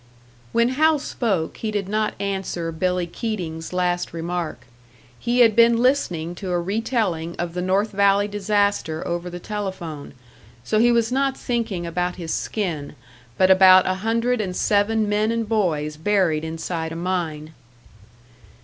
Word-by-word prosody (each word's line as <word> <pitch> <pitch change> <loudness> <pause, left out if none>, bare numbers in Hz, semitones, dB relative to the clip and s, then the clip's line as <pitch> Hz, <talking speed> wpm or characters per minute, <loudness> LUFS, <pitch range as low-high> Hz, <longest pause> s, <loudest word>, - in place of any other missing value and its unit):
When 235 +1 +3
Hal 310 +4 +3
spoke, 205 - -2
he 220 - -3
did 205 -2 -2
not 215 0 -1
answer 190 -4 -3
Billy 180 +2 0
Keating's 170 -4 -5
last 180 -1 -1
remark. 165 -6 -4 0.5
He 245 +1 +1
had 225 -3 +5
been 235 0 +6
listening 205 - +1
to 190 - -4
a 175 -1 +1
retelling 190 -4 -1
of 170 -1 -4
the 180 - -3
North 195 +4 +1
Valley 200 0 +3
disaster 205 -5 0
over 175 +1 -3
the 175 0 -7
telephone; 175 -9 -6 0.5
so 215 - +1
he 240 +2 +5
was 235 0 +2
not 270 +1 +1
thinking 225 -8 -2
about 180 +1 -2
his 165 -3 -4
skin, 165 -10 -3 0.4
but 185 0 +5
about 185 -1 +7
a 185 - +1
hundred 230 +2 +1
and 185 -3 -4
seven 210 +2 +2
men 210 +2 +1
and 230 -1 -1
boys 160 -9 0
buried 165 -3 +1
inside 160 0 -4
a - - -5
mine. 165 -3 -3
190 Hz, 150 wpm, -22 LUFS, 170-220 Hz, 0.5 s, about